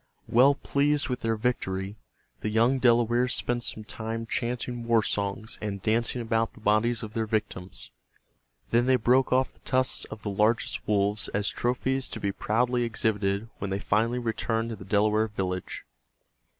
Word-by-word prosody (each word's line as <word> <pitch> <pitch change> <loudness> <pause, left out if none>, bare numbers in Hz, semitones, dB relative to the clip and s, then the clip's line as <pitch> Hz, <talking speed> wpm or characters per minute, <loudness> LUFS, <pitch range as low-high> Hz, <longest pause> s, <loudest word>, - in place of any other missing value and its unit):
Well 135 +4 +5
pleased 145 +1 +1
with 125 0 -2
their 115 0 0
victory, 100 -4 -2 0.4
the 105 - -2
young 115 +5 +3
Delawares 120 0 +3
spent 120 0 -1
some 110 -2 -4
time 115 +2 -5
chanting 120 +1 -3
war 115 -2 +4
songs 100 +2 -2
and 100 -2 -3
dancing 115 +4 +1
about 115 0 0
the - - -14
bodies 110 +2 +2
of 110 -1 -7
their 115 -2 -1
victims. 105 -4 -2 0.8
Then 120 +2 +3
they 130 - +5
broke 125 +2 +3
off 130 +1 +2
the - - -25
tusks 130 0 0
of 110 - -10
the 105 - -2
largest 105 +3 +1
wolves 105 0 +1
as 100 0 +1
trophies 130 +2 -1
to - - -6
be 100 -1 -1
proudly 120 +5 0
exhibited 105 -3 0
when 100 - -3
they 95 - -1
finally 110 +4 +1
returned 115 -1 -1
to - - -4
the 100 -2 -11
Delaware 105 +2 +2
village. 95 -3 -4
115 Hz, 165 wpm, -27 LUFS, 105-120 Hz, 0.8 s, Well